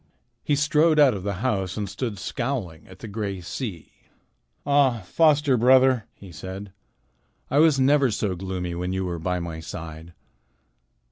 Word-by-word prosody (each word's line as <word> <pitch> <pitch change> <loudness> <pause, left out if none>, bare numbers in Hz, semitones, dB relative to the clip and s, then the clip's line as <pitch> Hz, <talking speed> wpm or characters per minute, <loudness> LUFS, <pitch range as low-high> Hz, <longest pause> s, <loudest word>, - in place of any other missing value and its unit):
He 145 - +1
strode 150 +2 +3
out 145 -4 +6
of 100 - -5
the 100 0 -4
house 95 -7 -1
and 105 -1 -2
stood 105 +2 -4
scowling 115 - -4
at 95 - -14
the 115 - -9
gray 100 -2 -4
sea. 90 - -6 0.7
"Ah, 140 -5 +3
foster 145 - +3
brother!" 130 0 +4
he 95 -3 -13
said. 95 +5 -8 0.8
"It 140 - +2
was 155 -3 +5
never 140 0 +4
so 105 -3 -1
gloomy 90 -1 -4
when 90 +2 -3
you 95 0 -2
were 85 -2 -4
by 90 +2 -1
my 85 -2 -5
side. 80 +1 -9
105 Hz, 155 wpm, -24 LUFS, 90-135 Hz, 0.8 s, out